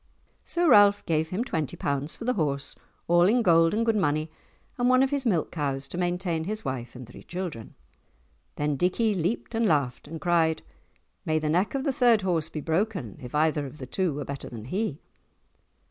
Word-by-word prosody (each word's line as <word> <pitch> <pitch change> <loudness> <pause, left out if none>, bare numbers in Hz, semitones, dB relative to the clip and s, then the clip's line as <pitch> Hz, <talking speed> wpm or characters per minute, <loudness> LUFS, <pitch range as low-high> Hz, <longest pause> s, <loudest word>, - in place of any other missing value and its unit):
So 345 0 0
Ralph 205 -6 +6
gave 160 -1 0
him 190 +7 -1
twenty 160 - -3
pounds 140 +2 -2
for 230 - -8
the 250 - +2
horse, 140 - -1 0.3
all 175 0 +5
in 235 +5 +3
gold 165 -3 +5
and 225 +2 0
good 225 -1 +2
money, 155 -4 0 0.5
and 245 +1 +3
one 255 +1 +5
of 270 - 0
his 280 -3 0
milk 175 -8 +1
cows 140 -4 -2
to - - -6
maintain 175 -2 -1
his 215 0 -4
wife 125 -3 -4
and 125 0 -8
three 125 - -13
children. 175 -11 -6 0.8
Then 145 -1 -1
Dickie 210 - +1
leaped 185 +7 -2
and 225 0 +2
laughed, 140 -7 0
and 165 0 -7
cried, 165 -1 +1 0.6
"May 155 0 0
the 155 -1 -1
neck 180 - +1
of 270 - -1
the 275 - 0
third 235 -5 +4
horse 165 -4 0
be 155 - -5
broken 165 - -2
if 125 +2 -7
either 150 -1 +1
of 135 - -11
the 130 - -7
two 180 +6 0
were 145 - -4
better 140 -1 -6
than 110 -3 -8
he!" 185 - -3
165 Hz, 200 wpm, -27 LUFS, 145-210 Hz, 0.8 s, Ralph